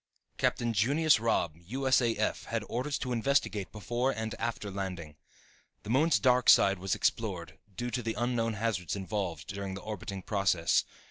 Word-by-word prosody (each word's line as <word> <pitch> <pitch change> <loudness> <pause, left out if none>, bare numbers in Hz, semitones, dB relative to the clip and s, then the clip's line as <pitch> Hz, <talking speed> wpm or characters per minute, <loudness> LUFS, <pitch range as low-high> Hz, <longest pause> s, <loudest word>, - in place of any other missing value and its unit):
Captain 120 -1 +1
Junius 140 +8 +3
Robb, 110 -8 +1
U.S.A.F., 115 +3 0
had 115 -2 -2
orders 130 +4 -2
to 125 - -4
investigate 115 -5 0
before 120 +5 -1
and 110 -4 -3
after 115 -3 -3
landing. 90 -6 -5 0.7
The 105 - -4
moon's 150 +6 +4
dark 125 -1 +3
side 100 -1 +6
was 95 +1 -1
explored, 85 -8 -2 0.2
due 120 0 -3
to 125 - -1
the 115 -1 -3
unknown 120 -2 0
hazards 105 -6 -2
involved, 95 -5 -4
during 100 -1 -4
the 95 - -7
orbiting 100 -3 -6
process. 95 -5 +2
110 Hz, 150 wpm, -30 LUFS, 95-120 Hz, 0.7 s, side